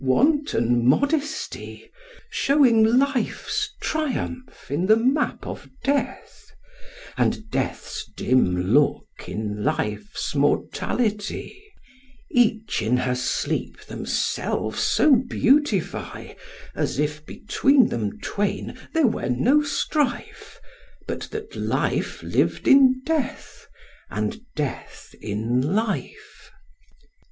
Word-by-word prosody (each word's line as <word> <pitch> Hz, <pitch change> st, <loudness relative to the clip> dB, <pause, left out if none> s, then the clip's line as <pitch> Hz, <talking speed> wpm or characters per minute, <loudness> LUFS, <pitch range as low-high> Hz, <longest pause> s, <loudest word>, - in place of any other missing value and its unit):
wanton 130 Hz, -, +2 dB
modesty! 285 Hz, -, 0 dB, 0.4 s
Showing 265 Hz, -6 st, +4 dB
life's 275 Hz, -, +1 dB
triumph 260 Hz, -, -3 dB
in 170 Hz, +6 st, 0 dB
the 215 Hz, -, +7 dB
map 260 Hz, +6 st, 0 dB
of -, -, -7 dB
death, 280 Hz, 0 st, -2 dB, 0.7 s
And 220 Hz, 0 st, 0 dB
death's 135 Hz, -2 st, -3 dB
dim 90 Hz, -6 st, +2 dB
look 145 Hz, +1 st, +1 dB
in 105 Hz, -1 st, -4 dB
life's 105 Hz, -, -2 dB
mortality: 215 Hz, -, -1 dB, 0.7 s
Each 225 Hz, -, +2 dB
in 115 Hz, +4 st, +2 dB
her 125 Hz, 0 st, 0 dB
sleep 125 Hz, +1 st, -2 dB
themselves -, -, -2 dB
so 295 Hz, -4 st, +5 dB
beautify, 250 Hz, -, 0 dB, 0.4 s
As -, -, -2 dB
if 150 Hz, +1 st, -1 dB
between 265 Hz, -, +2 dB
them 105 Hz, -3 st, -3 dB
twain 205 Hz, 0 st, -3 dB, 0.2 s
there 325 Hz, -2 st, +4 dB
were 225 Hz, -, 0 dB
no 250 Hz, -, +3 dB
strife, 285 Hz, -3 st, -2 dB, 0.5 s
But -, -, -5 dB
that 435 Hz, 0 st, -7 dB
life -, -, -1 dB
lived -, -, 0 dB
in 260 Hz, -2 st, +6 dB
death, 315 Hz, -4 st, -3 dB, 0.4 s
and 225 Hz, -, -3 dB
death 145 Hz, -3 st, -5 dB
in 110 Hz, +4 st, -1 dB
life. 220 Hz, -2 st, -4 dB
225 Hz, 95 wpm, -24 LUFS, -, 0.7 s, the